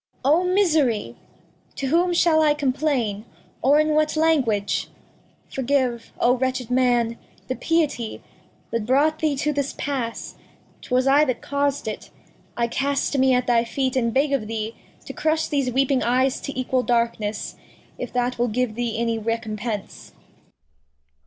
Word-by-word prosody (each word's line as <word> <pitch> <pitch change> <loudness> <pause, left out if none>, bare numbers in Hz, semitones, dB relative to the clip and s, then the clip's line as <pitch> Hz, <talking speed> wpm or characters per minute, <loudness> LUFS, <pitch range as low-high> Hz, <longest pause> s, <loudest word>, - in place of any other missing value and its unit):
Cor 275 +3 +4
A. - - +5
O - - -1
Misery! 310 - +2 0.6
To 275 - -3
whom 345 +4 +3
shall 335 -2 +4
I 300 -1 +4
complain, 260 -7 -1 0.4
or 285 +4 +4
in 305 0 +2
what 305 0 +2
Language? 260 -11 +1 0.6
Forgive, 260 -3 -1
O 250 +1 +4
wretched 255 -1 -2
Man, 240 -2 +2 0.3
the 255 - -2
Piety 295 -10 -1 0.5
That 230 -2 -2
brought 300 +5 +3
thee 310 -3 +1
to 300 +2 -1
this 280 -1 -2
Pass, 255 -5 -4 0.4
'twas 255 0 0
I 280 +2 +5
that 255 -4 -3
caus'd 280 -3 -1
it; 215 - -5 0.5
I 235 - +2
cast 280 +4 -1
me 260 -1 +4
at 250 0 +1
thy 235 -1 +3
Feet 260 +3 -2
and 235 -3 +1
beg 275 +4 +1
of 220 -6 -1
thee 220 0 -4 0.3
To - - -7
crush 315 0 0
these 275 -4 0
weeping 270 +1 +2
Eyes 255 +2 +1
to 275 -2 -5
equal 255 0 +1
Darkness, 230 -4 -1 0.4
If - - -5
that 250 0 -1
will 240 - +2
give 245 0 -1
thee 235 -1 -2
any 230 -1 0
Recompence. 220 -1 -4
255 Hz, 155 wpm, -23 LUFS, 235-285 Hz, 0.6 s, A